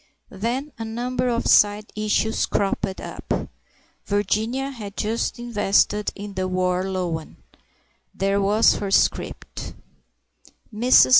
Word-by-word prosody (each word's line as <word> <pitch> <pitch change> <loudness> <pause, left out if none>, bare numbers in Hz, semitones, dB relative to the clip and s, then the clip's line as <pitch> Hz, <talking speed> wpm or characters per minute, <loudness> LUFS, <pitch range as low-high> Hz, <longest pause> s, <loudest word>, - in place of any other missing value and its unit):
Then 240 +9 -2
a - - -3
number 245 +3 -2
of 235 -1 0
side 210 +1 +4
issues 215 +1 +1
cropped 195 -1 -1
up. - - -4 0.6
Virginia 220 +7 0
had 210 -6 -8
just 225 +3 -1
invested 210 -3 +1
in 205 0 -7
the 185 0 -1
War 185 0 0
Loan; 175 -4 -3 0.8
there 195 +1 0
was 210 +3 +5
her 200 - -3
scrip. 195 - +1 1.3
Mrs. 220 - +6
210 Hz, 115 wpm, -23 LUFS, 195-230 Hz, 1.3 s, Mrs